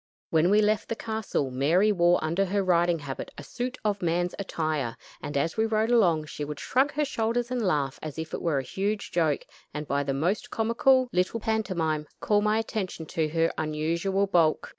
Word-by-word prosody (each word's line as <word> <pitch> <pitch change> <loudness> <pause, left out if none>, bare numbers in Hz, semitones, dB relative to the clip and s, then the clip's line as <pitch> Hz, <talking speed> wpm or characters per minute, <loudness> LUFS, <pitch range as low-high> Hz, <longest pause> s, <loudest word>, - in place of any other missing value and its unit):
When 160 +2 +4
we 210 +2 +5
left 210 -1 +1
the 230 - -1
castle, 220 - -2
Mary 165 +11 +3
wore 175 -2 +4
under 170 +5 +1
her 200 +1 0
riding 175 -2 +3
habit 140 -3 -6
a 145 - -8
suit 250 - -4
of 205 -1 0
man's 175 +1 0
attire, 155 -10 -2 0.2
and, 145 - -3
as 160 +7 -1
we 220 0 +2
rode 220 +1 +1
along, 175 -10 +3
she 150 - -6
would 145 0 -5
shrug 275 +3 +1
her 300 0 +1
shoulders 235 -1 -1
and 250 -1 -1
laugh 145 -9 0
as 155 -1 -6
if 160 0 -5
it - - -3
were 165 -5 +1
a 135 - -1
huge 200 +8 -3
joke; 160 -4 +1 0.3
and 150 0 -4
by 140 +1 +1
the 135 -1 -2
most 175 +9 -1
comical 250 +3 +3
little 185 +5 +1
pantomime, 180 -9 -1
call 205 -1 +2
my 210 +1 +2
attention 210 -7 -3
to 155 0 -1
her 165 +1 +1
unusual 165 +6 0
bulk. 170 -5 +2
180 Hz, 200 wpm, -27 LUFS, 155-215 Hz, 0.3 s, we